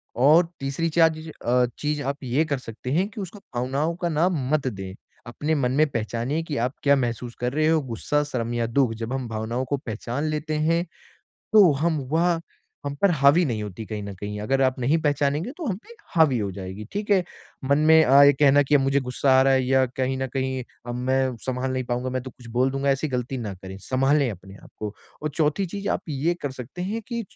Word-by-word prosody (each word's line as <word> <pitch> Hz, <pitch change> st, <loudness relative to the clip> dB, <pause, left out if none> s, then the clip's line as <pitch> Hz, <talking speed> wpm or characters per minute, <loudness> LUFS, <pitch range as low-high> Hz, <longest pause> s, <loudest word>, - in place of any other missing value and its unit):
और 155 Hz, +7 st, +5 dB
तीसरी 140 Hz, +5 st, -1 dB
चा 165 Hz, +1 st, +5 dB
ज 155 Hz, 0 st, -8 dB
अ, 125 Hz, +1 st, +3 dB
चीज़ 150 Hz, 0 st, -1 dB
आप 140 Hz, +1 st, -2 dB
ये 130 Hz, +6 st, +1 dB
कर 145 Hz, -3 st, -1 dB
सकते 125 Hz, +1 st, -7 dB
हैं, 180 Hz, +7 st, +2 dB
कि 210 Hz, 0 st, -7 dB
उसको 195 Hz, +2 st, -8 dB, 0.2 s
भावनाओं 135 Hz, +7 st, -1 dB
का 175 Hz, -, +2 dB
नाम 160 Hz, -3 st, +1 dB
मत 150 Hz, -3 st, +1 dB
दें। 95 Hz, -5 st, -5 dB, 0.3 s
अपने 150 Hz, +6 st, -1 dB
मन 125 Hz, -4 st, +1 dB
में 155 Hz, +1 st, +4 dB
पहचानिए 120 Hz, +7 st, -2 dB
कि 155 Hz, -3 st, -4 dB
आप 130 Hz, -, -10 dB
क्या 140 Hz, 0 st, +5 dB
महसूस 120 Hz, -2 st, -2 dB
कर 125 Hz, +1 st, -1 dB
रहे 155 Hz, +1 st, +2 dB
हो, 160 Hz, -1 st, +3 dB
गुस्सा 140 Hz, +4 st, -1 dB
शर्म 120 Hz, -5 st, -3 dB
या 120 Hz, -1 st, 0 dB
दुःख? 120 Hz, 0 st, +2 dB
जब 115 Hz, +2 st, -4 dB
हम 130 Hz, -2 st, -3 dB
भावनाओं 115 Hz, +3 st, -2 dB
को 140 Hz, +3 st, -1 dB
पहचान 120 Hz, +3 st, -4 dB
लेते 155 Hz, 0 st, -2 dB
हैं। 170 Hz, +1 st, +2 dB, 0.7 s
तो 200 Hz, -6 st, +8 dB
हम 165 Hz, -3 st, +2 dB
वह 170 Hz, +1 st, +2 dB, 0.5 s
हम 140 Hz, 0 st, -3 dB
पर 200 Hz, -2 st, +5 dB
हावी 145 Hz, +3 st, +5 dB
नहीं 115 Hz, -6 st, -2 dB
होती 105 Hz, +2 st, -7 dB
कहीं 105 Hz, -1 st, -5 dB
न 100 Hz, 0 st, -6 dB
कहीं। 105 Hz, +2 st, -6 dB
अगर 135 Hz, +5 st, +1 dB
आप 130 Hz, 0 st, +2 dB
नहीं 135 Hz, +6 st, +2 dB
पहचानेंगे 145 Hz, -, 0 dB
तो 345 Hz, -, -5 dB
हम 195 Hz, -, 0 dB
पे -, -, -20 dB
एक 460 Hz, -3 st, -17 dB
हावी 155 Hz, -7 st, +5 dB
हो 100 Hz, -2 st, -1 dB
जाएगी। 95 Hz, +2 st, -7 dB
ठीक 205 Hz, +1 st, -4 dB
है? 190 Hz, -3 st, +4 dB, 0.4 s
मन 140 Hz, +1 st, +3 dB
में 160 Hz, +1 st, +6 dB
अ, 140 Hz, +2 st, +7 dB
ये 145 Hz, -, +7 dB
कहना 145 Hz, +1 st, +5 dB
कि 145 Hz, +2 st, +4 dB
मुझे 135 Hz, +1 st, +2 dB
गुस्सा 130 Hz, +2 st, 0 dB
आ -, -, +6 dB
रहा 135 Hz, 0 st, +4 dB
है 130 Hz, -1 st, +3 dB
या 130 Hz, 0 st, +3 dB
कहीं 130 Hz, 0 st, 0 dB
न 130 Hz, 0 st, -2 dB
कहीं, 130 Hz, -1 st, -1 dB, 0.2 s
"अब 120 Hz, -, -3 dB
मैं 130 Hz, -1 st, +1 dB
संभाल 130 Hz, 0 st, -2 dB
नहीं 130 Hz, -, -1 dB
पाऊँगा, 125 Hz, +1 st, -2 dB
मैं 130 Hz, -, -2 dB
तो 130 Hz, -, -8 dB
कुछ 120 Hz, -1 st, -15 dB
बोल 130 Hz, +1 st, +3 dB
दूँगा" 135 Hz, +1 st, 0 dB
ऐसी 135 Hz, +3 st, 0 dB
गलती 125 Hz, 0 st, -2 dB
ना 110 Hz, -5 st, -4 dB
करें, 95 Hz, +1 st, -9 dB
संभालें 135 Hz, +4 st, +2 dB
अपने 95 Hz, 0 st, -12 dB
आपको। 105 Hz, -1 st, -7 dB, 0.3 s
और 155 Hz, -, -1 dB
चौथी 155 Hz, +4 st, +1 dB
चीज़ 200 Hz, +3 st, -5 dB
आप -, -, 0 dB
ये 150 Hz, +4 st, 0 dB
कर 145 Hz, -, -2 dB
सकते 130 Hz, +6 st, -8 dB
हैं 215 Hz, +5 st, -3 dB
कि 235 Hz, -2 st, -3 dB
135 Hz, 230 wpm, -24 LUFS, 125-155 Hz, 0.7 s, तो